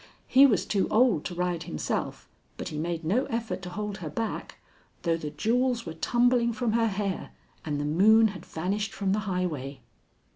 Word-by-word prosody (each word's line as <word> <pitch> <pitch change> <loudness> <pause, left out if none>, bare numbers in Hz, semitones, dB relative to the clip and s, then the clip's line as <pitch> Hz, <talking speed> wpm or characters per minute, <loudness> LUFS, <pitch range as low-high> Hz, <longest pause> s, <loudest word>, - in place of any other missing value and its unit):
He 270 +2 +7
was 200 -8 +1
too 200 -2 +1
old 220 - +3
to 175 - -4
ride 175 -1 -1
himself, 75 - -3 0.3
but - - -5
he 150 - -6
made 165 0 -3
no 230 - +2
effort 230 -4 -3
to 180 - -6
hold 210 +1 -4
her 170 -6 -6
back, 220 +9 -4 0.5
though 170 -1 +2
the 155 -2 -5
jewels 240 - 0
were 165 - -5
tumbling 240 +6 +2
from 235 0 -1
her 230 0 +2
hair 200 -2 -3 0.3
and 145 -2 -2
the 145 - -2
moon 215 +8 +5
had 180 -4 -9
vanished 200 +6 -3
from 195 -2 -1
the 205 - +2
highway. 150 -8 -3
195 Hz, 185 wpm, -27 LUFS, 165-225 Hz, 0.5 s, He